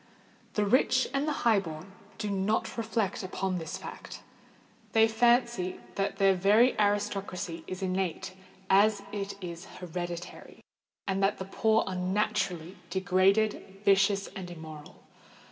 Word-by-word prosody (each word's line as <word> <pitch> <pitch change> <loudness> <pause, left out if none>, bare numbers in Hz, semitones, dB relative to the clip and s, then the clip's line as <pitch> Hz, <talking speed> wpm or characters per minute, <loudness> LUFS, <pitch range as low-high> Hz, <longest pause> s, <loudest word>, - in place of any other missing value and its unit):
The 210 - +2
rich 255 +3 +3
and 275 +2 0
the - - +1
high 225 -3 +5
born 165 0 -8 0.3
do 210 - -3
not 200 +3 0
reflect 225 -3 -1
upon 185 -1 -2
this 160 -1 -5
fact:—they 225 0 -3
fancy 235 -4 +2
that 195 0 -1
their 195 -1 +5
very 210 +7 +4
aristocracy 200 -4 -1
is 185 +1 -5
innate 185 0 -2 0.3
as 200 +1 +4
it 200 -1 -4
is 170 0 -7
hereditary, 175 0 -6 0.5
and 195 0 0
that 195 +1 +2
the 190 - -5
poor 220 +3 +2
are 190 - -4
naturally 185 -2 -1
degraded, 195 +1 +1
vicious, 195 0 +4
and 185 -2 -6
immoral. 160 -3 -10
195 Hz, 130 wpm, -29 LUFS, 185-210 Hz, 0.5 s, high